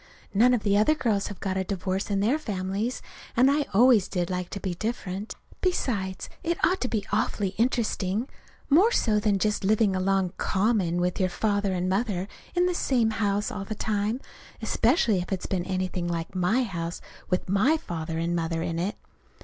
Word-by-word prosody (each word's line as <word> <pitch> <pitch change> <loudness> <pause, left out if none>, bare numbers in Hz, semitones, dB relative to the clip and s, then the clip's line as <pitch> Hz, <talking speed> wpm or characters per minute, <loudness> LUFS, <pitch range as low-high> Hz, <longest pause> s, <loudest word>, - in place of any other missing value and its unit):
None 245 +5 +5
of 225 - -3
the 200 -1 +2
other 260 +9 +4
girls 215 -8 0
have 205 - -8
got 190 -1 -2
a 190 - +1
divorce 190 +1 -2
in 200 -1 +1
their 245 +9 +2
families, 205 -1 -3 0.3
and 260 +3 +6
I 290 0 +1
always 230 -2 +5
did 180 -2 -2
like 180 -1 -3
to 200 - -5
be 190 -3 -3
different. 205 0 -4 0.3
Besides, 205 - -1
it 340 0 -1
ought 370 +2 +1
to 255 - +1
be 220 -5 -2
awfully 205 -1 0
interesting, 220 0 0 0.4
more 360 +11 +5
so 215 - +2
than 205 -1 +2
just 210 +1 0
living 205 0 +3
along, 190 -1 +1
common, 190 -4 +1
with 180 0 0
your 185 -1 +2
father 205 +1 0
and 180 0 -1
mother 195 -1 0 0.3
in 355 0 +3
the 360 - +1
same 245 -9 +1
house 205 -1 0
all 200 - -4
the 215 +2 -5
time 210 +3 -1 0.4
especially 225 - +2
if 175 - -5
it's 190 -2 -2
been 180 -2 -2
anything 185 -2 -2
like 170 0 -3
my 185 +8 +2
house 170 -5 -4 0.3
with 180 - 0
my 210 - +3
father 165 - -5
and 170 +1 0
mother 165 -1 -1
in 165 0 -2
it! 195 +6 -1
200 Hz, 190 wpm, -26 LUFS, 185-230 Hz, 0.4 s, and